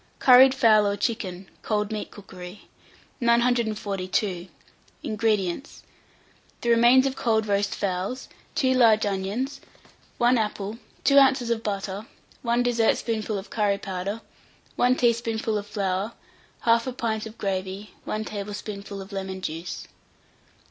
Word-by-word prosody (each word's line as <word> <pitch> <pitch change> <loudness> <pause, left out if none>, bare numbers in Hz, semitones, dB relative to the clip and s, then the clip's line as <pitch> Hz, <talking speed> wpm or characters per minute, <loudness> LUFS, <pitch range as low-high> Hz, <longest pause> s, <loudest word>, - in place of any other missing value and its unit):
] - - -36
CURRIED 260 +1 +8
FOWL 215 -5 +5
OR 200 0 -1
CHICKEN 195 -6 -3
(Cold 210 -1 -1
Meat 215 -1 -4
Cookery). 190 -1 -11 0.5
942. 215 -6 0 0.6
INGREDIENTS. 215 - -1 0.8
The 235 - -1
remains 240 +3 +6
of 270 -1 -1
cold 220 -5 +1
roast 200 -1 0
fowls, 195 +6 -3 0.3
2 260 -4 +2
large 225 -4 +5
onions, 205 +8 -2 0.6
1 240 0 +4
apple, 210 0 -3 0.2
2 280 0 +6
oz. 260 -3 +3
of 225 -1 0
butter, 200 0 -4 0.3
1 240 0 +1
dessertspoonful 230 -2 0
of 195 - -8
curry 205 -2 +1
powder, 195 +2 -4 0.5
1 250 +1 +3
teaspoonful 230 -2 0
of 205 - -9
flour, 200 +1 -2 0.5
1/2 235 +2 +2
pint 220 -1 -2
of 220 - -12
gravy, 190 +1 -3
1 215 0 -3
tablespoonful 205 -1 -6
of 195 - -15
lemon 190 -1 -4
juice. 165 0 -5
215 Hz, 125 wpm, -25 LUFS, 200-235 Hz, 0.8 s, CURRIED